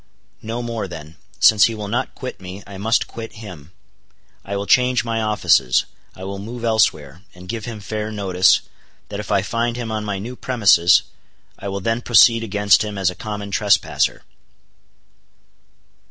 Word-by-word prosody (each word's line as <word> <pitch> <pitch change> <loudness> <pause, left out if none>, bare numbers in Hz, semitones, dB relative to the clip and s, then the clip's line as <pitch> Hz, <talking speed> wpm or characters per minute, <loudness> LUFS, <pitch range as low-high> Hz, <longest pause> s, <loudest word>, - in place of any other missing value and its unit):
No 115 +2 -4
more 115 -4 -4
then. 80 -2 -10 0.2
Since 105 -2 +6
he 115 - -1
will 105 -1 -6
not 115 +4 -2
quit 130 -5 -7
me, 95 +2 -9
I 100 -1 -10
must 110 +3 +1
quit 115 -1 -8
him. 90 -9 -11 0.7
I 100 - -5
will 100 - -3
change 125 +4 +3
my 115 -1 -1
offices; 90 - +2 0.3
I 95 - -10
will 100 +1 -5
move 115 +4 -8
elsewhere; 85 -9 +1
and 90 0 -13
give 110 +1 -5
him 115 -3 -7
fair 105 +1 -4
notice, 95 -3 +3 0.5
that - - -5
if - - -6
I - - +2
find 115 0 -1
him 115 -2 -4
on 110 -1 -3
my 100 -2 -3
new 115 +6 -7
premises 95 -10 +4 0.6
I 100 - -6
will 100 0 -4
then 115 +4 -1
proceed 115 -1 +5
against 105 -1 +3
him 105 -1 -6
as 95 -2 +1
a - - -11
common 105 +1 -6
trespasser. 100 0 +1
105 Hz, 170 wpm, -20 LUFS, 95-115 Hz, 0.7 s, Since